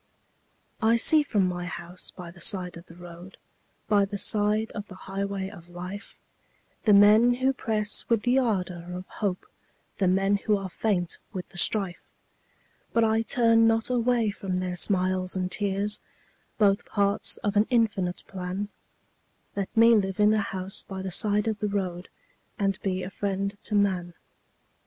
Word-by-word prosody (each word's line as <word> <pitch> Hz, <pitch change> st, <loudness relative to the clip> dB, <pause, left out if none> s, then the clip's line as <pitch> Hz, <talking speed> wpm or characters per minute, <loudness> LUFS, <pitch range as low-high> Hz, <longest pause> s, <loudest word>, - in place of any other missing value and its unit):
I 225 Hz, +1 st, +4 dB
see 310 Hz, +6 st, +6 dB
from 210 Hz, -9 st, +1 dB
my 175 Hz, -1 st, -4 dB
house 175 Hz, +1 st, -6 dB
by 175 Hz, -2 st, -10 dB
the 175 Hz, 0 st, -14 dB
side 180 Hz, -1 st, +2 dB
of 170 Hz, +1 st, -12 dB
the 165 Hz, -, -14 dB
road 175 Hz, +1 st, -12 dB, 0.5 s
By 205 Hz, -1 st, +3 dB
the 200 Hz, +1 st, -3 dB
side 210 Hz, +2 st, +2 dB
of 205 Hz, -1 st, -7 dB
the 185 Hz, -, -11 dB
highway 195 Hz, 0 st, -3 dB
of 175 Hz, -2 st, -13 dB
life, 180 Hz, +4 st, -8 dB, 0.7 s
The 210 Hz, -, +5 dB
men 215 Hz, +4 st, +6 dB
who 260 Hz, +2 st, +1 dB
press 215 Hz, -4 st, 0 dB
with 230 Hz, -3 st, +2 dB
the 250 Hz, +2 st, +3 dB
ardor 180 Hz, -8 st, -2 dB
of 180 Hz, +1 st, -7 dB
hope, 195 Hz, -3 st, -4 dB, 0.5 s
The 190 Hz, -, +2 dB
men 195 Hz, +2 st, +2 dB
who 210 Hz, +1 st, 0 dB
are 195 Hz, -2 st, -6 dB
faint 180 Hz, -4 st, -1 dB
with 185 Hz, -2 st, -5 dB
the 175 Hz, -, -5 dB
strife, 195 Hz, -3 st, +1 dB, 0.9 s
But 230 Hz, -, +3 dB
I 220 Hz, 0 st, +2 dB
turn 230 Hz, -1 st, +3 dB
not 225 Hz, +2 st, +1 dB
away 240 Hz, -3 st, +1 dB
from 195 Hz, -2 st, -4 dB
their 180 Hz, -1 st, -2 dB
smiles 185 Hz, 0 st, +1 dB
and 185 Hz, -1 st, -2 dB
tears, 205 Hz, +1 st, 0 dB, 0.6 s
Both 200 Hz, -2 st, +3 dB
parts 200 Hz, -1 st, +2 dB
of 205 Hz, 0 st, -1 dB
an 210 Hz, +2 st, +3 dB
infinite 210 Hz, -7 st, 0 dB
plan 190 Hz, +2 st, -5 dB, 0.9 s
Let 200 Hz, -1 st, -2 dB
me 230 Hz, +1 st, +7 dB
live 195 Hz, -3 st, +1 dB
in 210 Hz, +1 st, +5 dB
a 215 Hz, -, +2 dB
house 190 Hz, -1 st, -2 dB
by 190 Hz, -1 st, -7 dB
the 190 Hz, -, -4 dB
side 210 Hz, +2 st, +2 dB
of 215 Hz, -1 st, -2 dB
the 210 Hz, -, -1 dB
road 185 Hz, -3 st, -3 dB, 0.5 s
And 195 Hz, -1 st, -1 dB
be 185 Hz, -1 st, -2 dB
a 185 Hz, -, -6 dB
friend 200 Hz, 0 st, -3 dB
to 210 Hz, -, -1 dB
man. 185 Hz, -4 st, 0 dB
200 Hz, 170 wpm, -26 LUFS, 185-215 Hz, 0.9 s, me